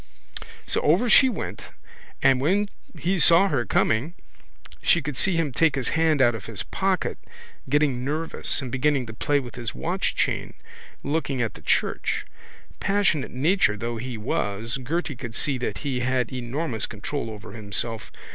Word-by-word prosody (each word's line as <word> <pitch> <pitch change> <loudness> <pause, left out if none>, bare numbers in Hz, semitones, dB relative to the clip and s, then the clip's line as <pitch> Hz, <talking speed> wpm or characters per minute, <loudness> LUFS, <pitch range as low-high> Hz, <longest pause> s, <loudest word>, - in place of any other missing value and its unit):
So - - +1
over 180 +11 +3
she 265 +3 +7
went - - -6 0.5
and 130 -1 +5
when 200 +8 +2 0.3
he 185 +2 0
saw 170 +5 +6
her 130 -6 0
coming 135 +11 +1 0.7
she 175 - +4
could 145 -2 -4
see 185 +6 +3
him 165 -4 +1
take 160 +1 +3
his 135 -3 -1
hand 160 -4 +3
out 120 - +5
of 105 -4 -7
his 105 -2 -3
pocket, 190 -2 -1 0.5
getting 140 -3 +2
nervous, 150 0 -1
and 125 - -5
beginning 130 0 +1
to 110 - -8
play 145 +6 +1
with 125 -3 -8
his 120 -3 -5
watchchain, 65 - -1 0.5
looking 145 -3 -1
up 115 -2 0
at - - -26
the - - -12
church. - - 0 0.5
Passionate 195 -8 +1
nature 145 - +2
though 115 +2 -3
he 120 +1 -5
was 110 +3 -2
Gerty 160 +2 -2
could 120 -2 -7
see 135 -3 0
that 125 - -4
he 130 -3 0
had 125 0 0
enormous 125 -1 -2
control 115 +4 -4
over 110 0 -9
himself. 110 +1 -4
135 Hz, 165 wpm, -25 LUFS, 120-160 Hz, 0.7 s, she